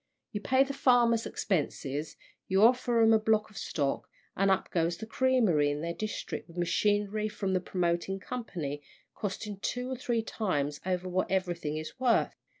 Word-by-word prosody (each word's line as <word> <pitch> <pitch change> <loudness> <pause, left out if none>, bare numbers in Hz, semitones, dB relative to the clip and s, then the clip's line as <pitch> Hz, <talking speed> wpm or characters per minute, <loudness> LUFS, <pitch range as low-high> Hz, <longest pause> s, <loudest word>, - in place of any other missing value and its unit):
You 205 - -4
pay 260 +4 +4
the 275 0 -4
farmers' 240 -4 +3
expenses, 150 -4 -2 0.3
you 190 +2 +3
offer 240 -1 +4
'em 225 0 +6
a 220 - +5
block 215 0 +1
of 210 - -13
stock, 140 -3 -2 0.3
and 195 +1 +2
up 190 0 +1
goes 170 0 +1
the 220 - -6
creamery 220 - +3
in 145 +1 -2
their 170 +1 -2
district 215 +4 -5
with 170 0 -14
machinery 205 +4 +1
from 205 -2 -2
the 185 - +1
promoting 180 +1 -1
company, 170 - -5 0.3
costing 205 0 -5
two 250 +5 -3
or - - -1
three 240 -3 -1
times 150 -11 -2
over 185 0 -1
what 185 +1 0
everything 175 -5 -1
is 155 +10 -7
worth. 250 -3 +3
195 Hz, 170 wpm, -30 LUFS, 170-225 Hz, 0.3 s, em